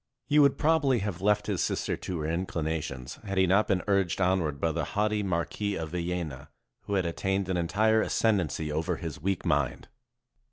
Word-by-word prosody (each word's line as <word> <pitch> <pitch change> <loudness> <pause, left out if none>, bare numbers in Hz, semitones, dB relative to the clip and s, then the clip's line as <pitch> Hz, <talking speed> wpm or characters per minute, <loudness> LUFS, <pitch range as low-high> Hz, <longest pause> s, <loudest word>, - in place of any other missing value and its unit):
He 150 +2 +3
would 140 -2 +5
probably 150 -5 +3
have 95 -4 -4
left 105 +1 +2
his 100 -4 -1
sister - - -1
to 85 -4 -5
her - - -3
inclinations, 80 -6 -3
had 100 -2 -4
he 95 - +5
not 95 +4 +3
been 90 -2 +1
urged 100 -4 +1
onward 90 -6 +1
by 80 - +1
the - - -2
haughty 105 0 +2
Marquis 100 +2 -1
of 80 -3 -4
Villena, 85 -5 -4 0.4
who 100 - -1
had 95 -2 +1
attained 95 +3 -1
an 95 - 0
entire 110 +6 +2
ascendancy 90 -11 0
over 80 +4 -1
his 80 -4 -6
weak 95 +3 -1
mind. 70 -7 0
90 Hz, 185 wpm, -28 LUFS, 80-100 Hz, 0.4 s, would